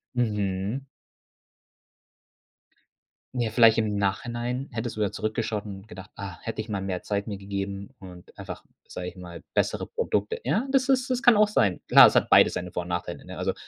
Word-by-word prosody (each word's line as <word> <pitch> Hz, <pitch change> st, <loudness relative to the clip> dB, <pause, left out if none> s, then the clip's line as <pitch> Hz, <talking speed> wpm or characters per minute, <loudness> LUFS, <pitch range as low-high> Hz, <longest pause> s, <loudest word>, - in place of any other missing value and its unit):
Mhm. 105 Hz, 0 st, -1 dB, 2.5 s
Ja, 120 Hz, -3 st, -1 dB
vielleicht 115 Hz, -1 st, +6 dB
im 105 Hz, -2 st, 0 dB
Nachhinein 120 Hz, +6 st, -2 dB
hättest 115 Hz, 0 st, -4 dB
du 110 Hz, -, -2 dB
da 100 Hz, -, +1 dB
zurückgeschaut 110 Hz, -1 st, -2 dB
und 100 Hz, 0 st, -9 dB
gedacht: 95 Hz, -2 st, -11 dB
„Ah, 100 Hz, -3 st, -7 dB
hätte 115 Hz, -1 st, -4 dB
ich 110 Hz, -, -10 dB
mal 100 Hz, -2 st, -2 dB
mehr 95 Hz, -2 st, -3 dB
Zeit 100 Hz, 0 st, -2 dB
mir 100 Hz, -2 st, -4 dB
gegeben 100 Hz, 0 st, -5 dB
und 90 Hz, -2 st, -13 dB
einfach, -, -, -7 dB, 0.2 s
sage 90 Hz, 0 st, -6 dB
ich 90 Hz, -, -8 dB
mal, 85 Hz, -2 st, -10 dB
bessere -, -, 0 dB
Produkte.“ 105 Hz, 0 st, -2 dB
Ja, 215 Hz, -, 0 dB
das 270 Hz, -1 st, +2 dB
ist, 260 Hz, 0 st, +2 dB
das 250 Hz, 0 st, 0 dB
kann 245 Hz, -5 st, +6 dB
auch 210 Hz, -, +5 dB
sein. 100 Hz, -, +1 dB
Klar, -, -, +10 dB
es -, -, -1 dB
hat -, -, +3 dB
beides -, -, +7 dB
seine 90 Hz, -1 st, -4 dB
Vor 90 Hz, -, -2 dB
und 85 Hz, -, -11 dB
Nachteile, 90 Hz, 0 st, -4 dB
ne, -, -, -9 dB
also -, -, -1 dB
105 Hz, 190 wpm, -26 LUFS, 95-120 Hz, 2.5 s, Klar